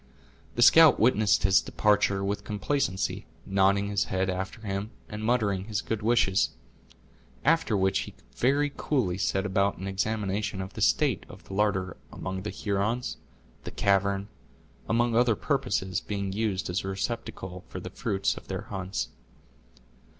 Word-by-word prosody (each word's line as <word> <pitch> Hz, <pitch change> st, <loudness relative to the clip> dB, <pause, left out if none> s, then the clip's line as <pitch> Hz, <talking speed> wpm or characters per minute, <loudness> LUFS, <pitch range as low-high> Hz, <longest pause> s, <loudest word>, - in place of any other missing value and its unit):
The 120 Hz, -, +4 dB
scout 160 Hz, +1 st, +8 dB
witnessed 110 Hz, -5 st, +3 dB
his 95 Hz, 0 st, +5 dB
departure 105 Hz, -2 st, +2 dB
with 100 Hz, +1 st, -2 dB
complacency, 105 Hz, -1 st, -1 dB, 0.2 s
nodding 100 Hz, +1 st, +2 dB
his 100 Hz, 0 st, +1 dB
head 95 Hz, 0 st, 0 dB
after 95 Hz, +4 st, -5 dB
him, 100 Hz, 0 st, -3 dB, 0.2 s
and 105 Hz, 0 st, -6 dB
muttering 105 Hz, -5 st, +1 dB
his 105 Hz, -1 st, -2 dB
good 115 Hz, -1 st, -3 dB
wishes; 105 Hz, -4 st, +3 dB, 1.0 s
after 155 Hz, -8 st, +3 dB
which 95 Hz, 0 st, +2 dB
he -, -, -6 dB, 0.2 s
very 145 Hz, +3 st, +2 dB
coolly 100 Hz, -11 st, 0 dB
set 95 Hz, 0 st, 0 dB
about 100 Hz, 0 st, +1 dB
an 95 Hz, -, -6 dB
examination 100 Hz, 0 st, -1 dB
of 95 Hz, 0 st, -5 dB
the -, -, -7 dB
state -, -, +2 dB
of -, -, -12 dB
the -, -, -10 dB
larder, 95 Hz, -3 st, 0 dB
among 95 Hz, 0 st, -5 dB
the 105 Hz, -, -4 dB
Hurons, 105 Hz, +5 st, -2 dB, 0.5 s
the -, -, -5 dB
cavern, 100 Hz, 0 st, +1 dB, 0.6 s
among 120 Hz, 0 st, +2 dB
other 120 Hz, -1 st, +4 dB
purposes, 125 Hz, -9 st, -1 dB
being 100 Hz, -2 st, -3 dB
used 100 Hz, -3 st, -1 dB
as 90 Hz, -, -1 dB
a -, -, -5 dB
receptacle 95 Hz, -2 st, -4 dB
for -, -, -7 dB
the -, -, -8 dB
fruits 95 Hz, 0 st, -1 dB
of -, -, -11 dB
their -, -, -3 dB
hunts. 95 Hz, -10 st, -4 dB
100 Hz, 150 wpm, -28 LUFS, 95-110 Hz, 1.0 s, scout